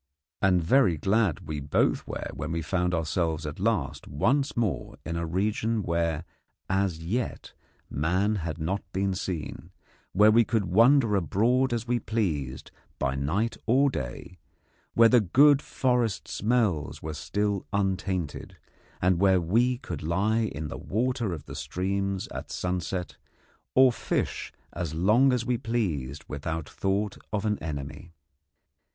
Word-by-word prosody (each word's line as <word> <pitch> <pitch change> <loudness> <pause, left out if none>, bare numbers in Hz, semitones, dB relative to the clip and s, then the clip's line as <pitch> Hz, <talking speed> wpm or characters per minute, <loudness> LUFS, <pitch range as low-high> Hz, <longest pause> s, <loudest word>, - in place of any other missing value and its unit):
And 90 -3 +3
very 90 - +4
glad 95 +1 +1
we 75 -1 -3
both 70 0 +1
were - - -5
when 75 - -5
we 85 -1 -2
found 90 +2 0
ourselves 80 -1 -1
at 75 +2 -6
last 100 -8 -1
once 135 - +1
more 110 -6 -1
in 85 - -3
a 85 0 -2
region 105 +5 0
where 85 -2 -1 0.4
as 95 -4 0
yet 115 +7 -3 0.3
man 95 +8 0
had 85 -4 -4
not 90 +5 -2
been 95 0 0
seen, 90 -4 -5 0.4
where 105 +3 +6
we 115 +2 +6
could 110 -2 0
wander 115 +4 +5
abroad 115 - +2
as 120 0 -2
we 120 0 +1
pleased 80 - -2 0.3
by 65 -1 0
night 85 +13 -1
or 135 +4 +4
day, 85 - -6 0.6
where 115 0 +7
the 120 0 +5
good 140 - +5
forest 125 -6 0
smells 105 -8 0
were 80 0 -4
still 100 +4 -2
untainted, 95 -4 -2 0.5
and 90 -1 +3
where 95 -1 +5
we 115 +9 +2
could - - -6
lie 100 +8 +1
in 75 +2 -4
the - - -7
water 120 0 -1
of 80 -4 -6
the - - -9
streams 100 +2 -2
at - - -7
sunset 90 0 -3 0.6
or 130 -1 +7
fish - - -2 0.2
as 85 -3 -4
long 110 +11 +4
as 125 -2 0
we 125 -2 0
pleased 85 - -2
without 80 +2 -4
thought 100 +1 -1
of 105 -1 -1
an 105 -1 0
enemy. 75 +2 -6
95 Hz, 145 wpm, -27 LUFS, 80-115 Hz, 0.6 s, where